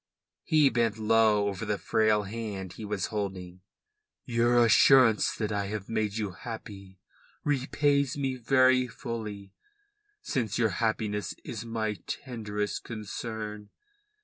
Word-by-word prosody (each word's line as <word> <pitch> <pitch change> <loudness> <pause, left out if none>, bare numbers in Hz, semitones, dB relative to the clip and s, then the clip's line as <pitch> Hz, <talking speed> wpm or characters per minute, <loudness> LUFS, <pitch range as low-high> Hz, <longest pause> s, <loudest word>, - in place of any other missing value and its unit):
He 150 -3 +4
bent 115 -3 +1
low 110 -1 +3
over 100 +1 -3
the 105 -2 -1
frail 110 -1 +2
hand 100 -3 -5
he 110 - -9
was 100 -3 -2
holding. 95 -3 -4 0.6
"Your 120 -1 +3
assurance 115 -1 +5
that 110 -1 -2
I 100 -1 -1
have 105 -1 -5
made 110 -2 -1
you 105 -3 -2
happy 100 -2 -9 0.5
repays 140 0 +1
me 135 -2 -1
very 130 +1 +3
fully, 110 -5 -6 0.7
since 115 -5 -1
your 115 -2 +3
happiness 105 -1 -1
is 115 -1 -6
my 110 -2 -2
tenderest 105 -5 -4
concern. 105 -1 -6
110 Hz, 120 wpm, -28 LUFS, 105-120 Hz, 0.7 s, assurance